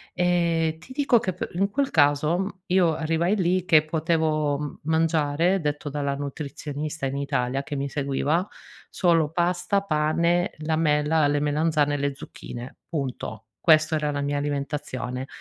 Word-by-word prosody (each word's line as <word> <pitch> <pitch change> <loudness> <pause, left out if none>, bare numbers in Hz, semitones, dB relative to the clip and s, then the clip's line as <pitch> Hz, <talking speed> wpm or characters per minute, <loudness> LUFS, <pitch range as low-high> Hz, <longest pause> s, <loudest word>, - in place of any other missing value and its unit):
ehm, 170 -3 +1
ti 255 +10 -12
dico 275 -4 +3
che 185 - -2
pe 180 - -4
in 195 +3 +1
quel 275 +6 -1
caso 160 +6 +2
io 180 -3 +3
arrivai 165 +4 +1
lì 185 -2 +1
che 155 -3 +5
potevo 155 -2 0
m 150 0 -6
mangiare, 160 +2 +2
detto 150 0 -2
dalla 140 -1 -2
nutrizionista 145 +1 -5
in 135 +1 -2
Italia 135 -1 -1
che 145 +1 -6
mi 140 0 -2
seguiva, 145 +6 0 0.4
solo 165 -4 +2
pasta, 180 +3 +1
pane, 170 +1 +1
la 160 0 +1
mela, 150 -1 +2
le 145 0 +1
melanzane 150 0 +1
e - - 0
le 140 -1 -1
zucchine, 120 -2 -9
punto. 125 -7 -4 0.2
Questo 155 -1 +4
era 150 -1 0
la 145 -1 -2
mia 145 0 -1
alimentazione. 140 -3 -3
155 Hz, 150 wpm, -25 LUFS, 145-170 Hz, 0.4 s, che